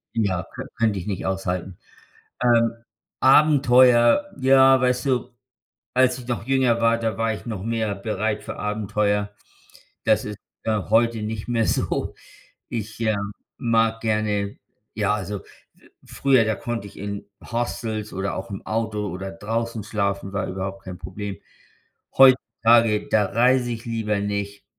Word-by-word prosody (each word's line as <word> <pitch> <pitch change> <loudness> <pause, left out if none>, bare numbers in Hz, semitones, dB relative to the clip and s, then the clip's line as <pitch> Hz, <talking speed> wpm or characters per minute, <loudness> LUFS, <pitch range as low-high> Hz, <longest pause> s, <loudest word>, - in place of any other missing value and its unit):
Ja, 95 -6 0
könn - - -7
könnte 110 -4 +1
ich 90 - -8
nicht 100 -3 -3
aushalten. 95 -1 -3 0.6
Ähm, 115 -2 +4 0.5
Abenteuer, 130 -1 +5 0.2
ja, 130 0 +6
weißt 125 0 +1
du, 125 -1 0 0.6
als 130 0 +3
ich 125 0 -11
noch 105 -5 -2
jünger 130 -3 +2
war, 115 0 +4
da 110 -3 -2
war 115 0 0
ich 110 - -8
noch 105 -5 -4
mehr 115 -2 -1
bereit 105 +1 -2
für - - -6
Abenteuer, 105 -1 -1 0.7
das 110 -1 +2
ist, 105 -1 -6 0.3
äh, 110 -1 +1
heute 115 0 +3
nicht 110 +1 -5
mehr 115 -2 +1
so. - - -1 0.5
Ich, 110 -1 -5
ähm, 105 -2 -1 0.2
mag 115 -2 +1
gerne 105 -2 -1 0.4
ja, 105 -1 +1
also, 105 -1 -4 0.6
früher, 130 -4 +2
da 110 0 0
konnte 115 -1 -4
ich 100 - -13
in 100 0 -5 0.3
Hostels 115 -2 -3
oder 95 +1 -2
auch 95 - -6
im 100 - -7
Auto 110 -2 -2
oder 95 +2 -5
draußen 115 +4 -3
schlafen, 100 -2 -2
war 95 - -1
überhaupt 95 +1 -5
kein 90 -2 -8
Problem. 95 +3 -6 0.8
Heutzutage, 115 -4 +5
da 105 -1 +4
reise 125 +3 +2
ich 115 0 -6
lieber 110 -3 -1
nicht, 100 0 -4
110 Hz, 145 wpm, -23 LUFS, 100-115 Hz, 0.8 s, ja